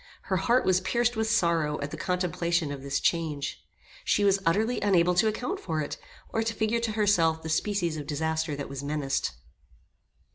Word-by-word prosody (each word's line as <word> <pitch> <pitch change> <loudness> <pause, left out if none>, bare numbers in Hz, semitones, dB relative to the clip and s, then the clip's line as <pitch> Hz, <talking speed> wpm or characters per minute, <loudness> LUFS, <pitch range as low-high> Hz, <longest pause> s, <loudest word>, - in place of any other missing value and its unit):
Her - - +3
heart 235 +7 +2
was 185 -1 +3
pierced 240 +5 +1
with 220 0 0
sorrow 165 -8 +2
at 145 +1 -4
the - - -4
contemplation 170 -2 -1
of 140 -1 -6
this 140 0 -1
change. 155 -4 -1 0.4
She 205 - +2
was 200 -1 +4
utterly 220 +8 +1
unable 180 -3 +3
to 180 +5 +3
account 250 - -2
for 160 -3 -3
it, 150 - -3 0.3
or 225 - 0
to 225 0 -2
figure 220 +1 +1
to 230 -2 -2
herself 175 -7 +2
the 160 - -5
species 170 -1 0
of 145 -2 -6
disaster 160 0 -1
that 140 0 -5
was 140 -1 -6
menaced. 140 -1 -1
170 Hz, 185 wpm, -28 LUFS, 155-210 Hz, 0.4 s, was